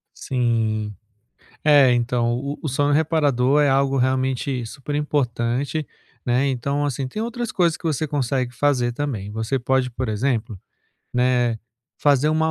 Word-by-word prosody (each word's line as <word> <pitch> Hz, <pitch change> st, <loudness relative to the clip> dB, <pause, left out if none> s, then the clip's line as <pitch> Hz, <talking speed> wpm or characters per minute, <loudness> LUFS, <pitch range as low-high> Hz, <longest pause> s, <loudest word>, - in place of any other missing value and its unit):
Sim, 115 Hz, -4 st, -1 dB, 0.7 s
é, 145 Hz, -4 st, +6 dB
então, 120 Hz, 0 st, +1 dB
o 140 Hz, +2 st, -5 dB
o -, -, -1 dB
sono 145 Hz, +2 st, +1 dB
reparador 145 Hz, -3 st, +2 dB
é 145 Hz, -, +4 dB
algo 135 Hz, 0 st, +2 dB
realmente 130 Hz, 0 st, 0 dB
super 135 Hz, +5 st, -6 dB
importante, 140 Hz, 0 st, -1 dB, 0.4 s
né, 125 Hz, +3 st, +2 dB
então, 140 Hz, +3 st, -1 dB
assim, 135 Hz, -1 st, -2 dB
tem 210 Hz, +12 st, -5 dB
outras 235 Hz, 0 st, -3 dB
coisas 170 Hz, -3 st, +2 dB
que -, -, -23 dB
você 155 Hz, -1 st, -1 dB
consegue 130 Hz, -3 st, -1 dB
fazer 125 Hz, -2 st, +1 dB
também. 120 Hz, -8 st, -4 dB
Você 110 Hz, +5 st, -1 dB
pode, 130 Hz, +1 st, +1 dB
por 125 Hz, 0 st, -4 dB
exemplo, 110 Hz, -2 st, -1 dB, 0.5 s
né, 125 Hz, -2 st, +2 dB, 0.4 s
fazer 145 Hz, 0 st, +3 dB
uma 160 Hz, +1 st, +2 dB
130 Hz, 145 wpm, -22 LUFS, 120-145 Hz, 0.7 s, é